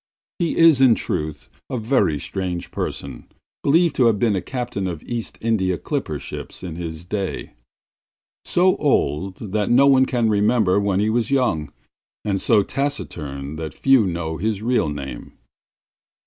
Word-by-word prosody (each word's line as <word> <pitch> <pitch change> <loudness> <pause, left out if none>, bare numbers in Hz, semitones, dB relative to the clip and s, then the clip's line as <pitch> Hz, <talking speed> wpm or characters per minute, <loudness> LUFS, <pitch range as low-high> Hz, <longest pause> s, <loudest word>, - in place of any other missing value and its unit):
He 170 -2 0
is, 165 -5 +6
in 125 -4 +6
truth, 75 -5 -3 0.2
a 125 - -2
very 110 - +1
strange 90 +3 -4
person, 65 -3 -5 0.4
believed 165 +4 +3
to 125 - +5
have 110 -3 +3
been 105 -1 +2
a 95 - -1
captain 120 -2 -4
of 85 -4 -5
East 120 -2 -5
India 95 -6 +1
clipper - - -3
ships - - -7
in 85 -3 -5
his 85 -1 -6
day; 100 0 -4 0.9
so 185 +1 +3
old 95 - 0 0.2
that 105 -1 0
no 130 +3 +5
one 130 -1 +5
can 120 -3 +1
remember 105 -2 +3
when 100 -1 +1
he 105 +1 +1
was 115 0 0
young, 120 - 0 0.5
and 100 -2 0
so 110 -4 +4
taciturn 80 - -4
that 80 -3 -6
few 135 -6 +4
know 85 -2 -3
his 105 +2 -2
real 120 -9 +1
name. 70 -4 -7
105 Hz, 155 wpm, -22 LUFS, 85-125 Hz, 0.9 s, is